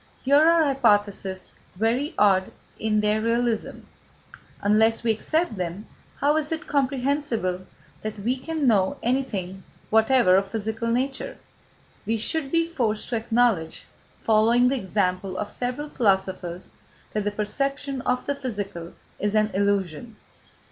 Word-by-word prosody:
Here 280 Hz, +2 st, +5 dB
are 330 Hz, +1 st, +5 dB
hypotheses 205 Hz, -8 st, +1 dB, 0.2 s
very 235 Hz, -, 0 dB
odd 190 Hz, -2 st, +3 dB, 0.3 s
in 215 Hz, -1 st, +1 dB
their 210 Hz, +1 st, +1 dB
realism. 230 Hz, 0 st, -1 dB, 0.8 s
Unless 220 Hz, +3 st, +3 dB
we 230 Hz, -, +3 dB
accept 310 Hz, -, -1 dB
them, 180 Hz, +3 st, -4 dB, 0.3 s
how 295 Hz, +2 st, +2 dB
is 305 Hz, 0 st, -1 dB
it 320 Hz, -, -3 dB
comprehensible 260 Hz, -9 st, -1 dB, 0.3 s
that 215 Hz, 0 st, -5 dB
we 240 Hz, +5 st, 0 dB
can 315 Hz, +2 st, -3 dB
know 200 Hz, -6 st, +3 dB
anything 205 Hz, -7 st, -2 dB, 0.3 s
whatever 220 Hz, -3 st, +5 dB
of 195 Hz, 0 st, 0 dB
physical 220 Hz, +2 st, -3 dB
nature? 265 Hz, -, -2 dB, 0.7 s
We 225 Hz, +1 st, +1 dB
should 275 Hz, +5 st, -1 dB
be 330 Hz, 0 st, +3 dB
forced 235 Hz, -10 st, -2 dB
to 245 Hz, -, -1 dB
acknowledge, 225 Hz, -7 st, +1 dB, 0.4 s
following 230 Hz, +3 st, +4 dB
the 275 Hz, -, +1 dB
example 190 Hz, -4 st, -1 dB
of 210 Hz, -, -3 dB
several 250 Hz, +4 st, -3 dB
philosophers, 190 Hz, -7 st, -1 dB, 0.4 s
that 210 Hz, -, -1 dB
the 205 Hz, -, 0 dB
perception 275 Hz, +6 st, -3 dB
of 250 Hz, 0 st, -1 dB
the 285 Hz, -, 0 dB
physical 205 Hz, -11 st, -5 dB, 0.3 s
is 205 Hz, +1 st, -1 dB
an 215 Hz, 0 st, +2 dB
illusion. 200 Hz, +1 st, -1 dB
225 Hz, 135 wpm, -25 LUFS, 200-265 Hz, 0.8 s, Here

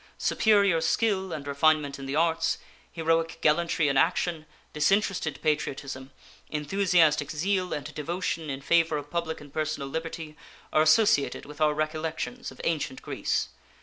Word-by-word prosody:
Superior 200 Hz, -6 st, +3 dB
skill 190 Hz, +2 st, +1 dB
and 150 Hz, -3 st, -5 dB
refinement 145 Hz, 0 st, +2 dB
in 135 Hz, -, -7 dB
the 135 Hz, -, -2 dB
arts, 165 Hz, +1 st, +1 dB, 0.3 s
heroic 165 Hz, 0 st, 0 dB
gallantry 165 Hz, 0 st, +2 dB
in 140 Hz, -1 st, +1 dB
action, 165 Hz, 0 st, +1 dB, 0.3 s
disinterested 175 Hz, +1 st, +1 dB
patriotism, 135 Hz, -3 st, -2 dB, 0.4 s
enthusiastic 155 Hz, -2 st, +2 dB
zeal 185 Hz, +4 st, -1 dB
and 145 Hz, -, -4 dB
devotion 165 Hz, 0 st, -3 dB
in 135 Hz, 0 st, -4 dB
favor 165 Hz, 0 st, +2 dB
of 145 Hz, 0 st, -7 dB
public 170 Hz, -2 st, -2 dB
and 145 Hz, -2 st, -14 dB
personal 155 Hz, -3 st, -2 dB
liberty 160 Hz, +1 st, -5 dB, 0.4 s
are 155 Hz, -, +5 dB
associated 155 Hz, 0 st, +3 dB
with 150 Hz, +2 st, -11 dB
our 150 Hz, -1 st, +3 dB
recollections 160 Hz, +10 st, -3 dB
of -, -, -14 dB
ancient 150 Hz, -5 st, -2 dB
Greece. -, -, -1 dB
160 Hz, 140 wpm, -27 LUFS, 150-170 Hz, 0.4 s, are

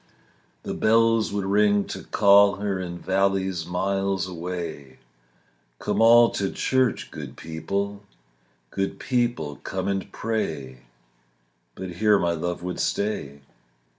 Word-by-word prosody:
The -, -, -4 dB
bells 115 Hz, 0 st, +3 dB
would 100 Hz, -1 st, -2 dB
ring 100 Hz, 0 st, +3 dB
to -, -, -5 dB
call 100 Hz, 0 st, +5 dB
her 100 Hz, -1 st, -2 dB
In 90 Hz, -1 st, -5 dB
valleys 95 Hz, -2 st, 0 dB
miles 95 Hz, 0 st, -1 dB
away: 85 Hz, -6 st, -6 dB, 0.8 s
"Come -, -, -1 dB
all 115 Hz, +1 st, +7 dB
to 100 Hz, -1 st, -1 dB
church, 130 Hz, -3 st, 0 dB
good -, -, -8 dB
people; 100 Hz, +6 st, -4 dB, 0.7 s
Good 95 Hz, 0 st, -2 dB
people, 120 Hz, -, -1 dB
come 95 Hz, 0 st, -4 dB
and 100 Hz, -1 st, -2 dB
pray." 70 Hz, -, -4 dB, 0.9 s
But 95 Hz, -1 st, -6 dB
here 105 Hz, 0 st, +4 dB
my 85 Hz, -3 st, +1 dB
love 85 Hz, +1 st, -3 dB
would 90 Hz, 0 st, -4 dB
stay. 70 Hz, -9 st, -2 dB
95 Hz, 120 wpm, -24 LUFS, 85-105 Hz, 0.9 s, all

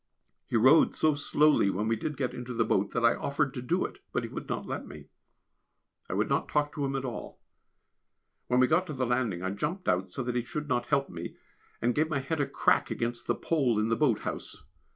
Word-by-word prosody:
He -, -, +1 dB
rowed 130 Hz, +8 st, +6 dB
so 155 Hz, -1 st, +3 dB
slowly 145 Hz, -5 st, +3 dB
when 105 Hz, +3 st, -1 dB
we 115 Hz, -, +2 dB
did 150 Hz, +5 st, -4 dB
get 130 Hz, -3 st, -1 dB
into 125 Hz, 0 st, -6 dB
the 115 Hz, -1 st, +2 dB
boat 100 Hz, +1 st, +1 dB
that 115 Hz, -, 0 dB
I 115 Hz, -, +6 dB
offered 140 Hz, -1 st, -1 dB
to 125 Hz, -, -5 dB
do 170 Hz, +9 st, 0 dB
it, 400 Hz, -, -8 dB
but -, -, -1 dB
he -, -, -5 dB
would -, -, -7 dB
not -, -, -2 dB
let -, -, -5 dB
me. -, -, -11 dB, 1.0 s
I -, -, -2 dB
would -, -, +1 dB
not -, -, 0 dB
talk 145 Hz, 0 st, 0 dB
to 145 Hz, -, -3 dB
him 135 Hz, 0 st, -1 dB
at 135 Hz, 0 st, -2 dB
all. 120 Hz, -4 st, -6 dB, 1.1 s
When 125 Hz, -, +2 dB
we 130 Hz, -, +6 dB
got 175 Hz, +7 st, +2 dB
to 155 Hz, -, -4 dB
the 130 Hz, -2 st, -1 dB
landing 120 Hz, -7 st, 0 dB
I 95 Hz, -, -1 dB
jumped 155 Hz, -, -3 dB
out 90 Hz, +1 st, +1 dB
so 130 Hz, -, -3 dB
that 125 Hz, 0 st, -2 dB
he 120 Hz, -, +1 dB
should 150 Hz, +5 st, -5 dB
not 120 Hz, -3 st, 0 dB
help 140 Hz, -1 st, +2 dB
me, 85 Hz, -1 st, -7 dB, 0.5 s
and 120 Hz, +1 st, +3 dB
gave 155 Hz, +4 st, +1 dB
my 155 Hz, -, 0 dB
head 140 Hz, +3 st, -2 dB
a 140 Hz, -, 0 dB
crack -, -, +2 dB
against 120 Hz, 0 st, -3 dB
the -, -, +2 dB
pole 135 Hz, -9 st, +1 dB
in 110 Hz, +1 st, +1 dB
the 115 Hz, -, +2 dB
boat 130 Hz, -7 st, +2 dB
house. -, -, -6 dB
130 Hz, 240 wpm, -29 LUFS, 115-150 Hz, 1.1 s, rowed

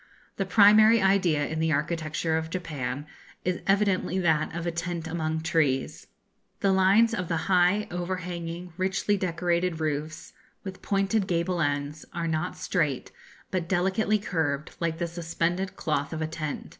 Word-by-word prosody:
The 195 Hz, -, -1 dB
primary 215 Hz, +3 st, +7 dB
idea 190 Hz, -7 st, +3 dB
in 160 Hz, +1 st, -3 dB
the 160 Hz, 0 st, +1 dB
architecture 155 Hz, +1 st, -1 dB
of 160 Hz, 0 st, -2 dB
Japan 145 Hz, -6 st, -4 dB, 0.4 s
is 180 Hz, 0 st, -1 dB
evidently 195 Hz, -2 st, +2 dB
that 160 Hz, -4 st, +1 dB
of 170 Hz, 0 st, -4 dB
a 170 Hz, -, 0 dB
tent 170 Hz, 0 st, -4 dB
among 160 Hz, -1 st, -2 dB
trees. 155 Hz, -5 st, 0 dB, 0.5 s
The 195 Hz, -, +3 dB
lines 195 Hz, +5 st, +4 dB
of 185 Hz, -7 st, -2 dB
the 165 Hz, -, 0 dB
high, 185 Hz, +2 st, +3 dB
overhanging, 175 Hz, -1 st, -4 dB
richly 195 Hz, +2 st, +1 dB
decorated 175 Hz, -2 st, -1 dB
roofs, 155 Hz, 0 st, -3 dB, 0.3 s
with 190 Hz, -2 st, -8 dB
pointed 195 Hz, 0 st, 0 dB
gable 175 Hz, 0 st, 0 dB
ends, 145 Hz, 0 st, -1 dB
are 170 Hz, -1 st, -2 dB
not 160 Hz, +2 st, -2 dB
straight, 150 Hz, -8 st, -1 dB, 0.4 s
but 175 Hz, -3 st, -2 dB
delicately 195 Hz, +4 st, +2 dB
curved, 160 Hz, -7 st, -2 dB
like 165 Hz, -1 st, -1 dB
the 170 Hz, -, -1 dB
suspended 170 Hz, +2 st, -2 dB
cloth 145 Hz, -2 st, -2 dB
of 160 Hz, -, -4 dB
a -, -, -1 dB
tent. 155 Hz, -2 st, -5 dB
170 Hz, 150 wpm, -27 LUFS, 160-190 Hz, 0.5 s, primary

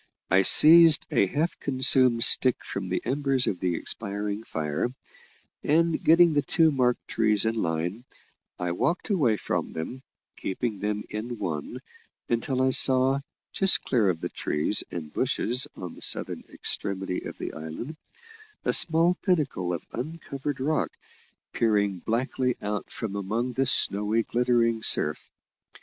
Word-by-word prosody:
I 95 Hz, +1 st, +5 dB
seized 160 Hz, -, +7 dB
a 100 Hz, -, +2 dB
half 155 Hz, -, -2 dB
consumed 130 Hz, -3 st, +3 dB
stick 130 Hz, 0 st, +4 dB
from 95 Hz, -2 st, -5 dB
the 90 Hz, -, -2 dB
embers 135 Hz, 0 st, 0 dB
of 90 Hz, -, -2 dB
the 90 Hz, -2 st, -1 dB
expiring 100 Hz, +4 st, -4 dB
fire: 75 Hz, -1 st, -2 dB, 0.7 s
and, 165 Hz, +2 st, +1 dB
getting 170 Hz, 0 st, +5 dB
the 145 Hz, -, +2 dB
two 160 Hz, +3 st, +2 dB
marked 125 Hz, -3 st, 0 dB
trees 110 Hz, -1 st, +1 dB
in 110 Hz, -, +1 dB
line, 90 Hz, +2 st, -3 dB, 0.5 s
I 90 Hz, -1 st, -3 dB
walked 170 Hz, -, -1 dB
away 130 Hz, -, +2 dB
from -, -, -3 dB
them, 120 Hz, +11 st, -6 dB, 0.4 s
keeping 105 Hz, +1 st, -4 dB
them 105 Hz, +1 st, -2 dB
in 115 Hz, +3 st, -5 dB
one, 75 Hz, -7 st, -5 dB, 0.5 s
until 130 Hz, +3 st, 0 dB
I 130 Hz, -, +2 dB
saw, 130 Hz, +1 st, +4 dB, 0.3 s
just 195 Hz, -1 st, +4 dB
clear 115 Hz, -7 st, +1 dB
of 80 Hz, -3 st, -2 dB
the -, -, -3 dB
trees 75 Hz, +8 st, -1 dB
and 80 Hz, -3 st, -7 dB
bushes 125 Hz, +3 st, 0 dB
on 90 Hz, -2 st, -8 dB
the -, -, -14 dB
southern -, -, -1 dB
extremity 95 Hz, -2 st, -3 dB
of -, -, -8 dB
the -, -, -6 dB
island, 80 Hz, -, -7 dB, 0.7 s
a -, -, +1 dB
small 170 Hz, +2 st, +4 dB
pinnacle 145 Hz, -, -1 dB
of 85 Hz, -, -5 dB
uncovered 145 Hz, 0 st, -5 dB
rock 155 Hz, +4 st, 0 dB, 0.6 s
peering 100 Hz, -5 st, 0 dB
blackly 125 Hz, +2 st, -1 dB
out 105 Hz, 0 st, -4 dB
from 105 Hz, -3 st, -6 dB
among 110 Hz, +6 st, -2 dB
the 135 Hz, +1 st, 0 dB
snowy 105 Hz, -2 st, +2 dB
glittering 120 Hz, -2 st, +1 dB
surf. -, -, 0 dB
115 Hz, 145 wpm, -26 LUFS, 100-135 Hz, 0.7 s, seized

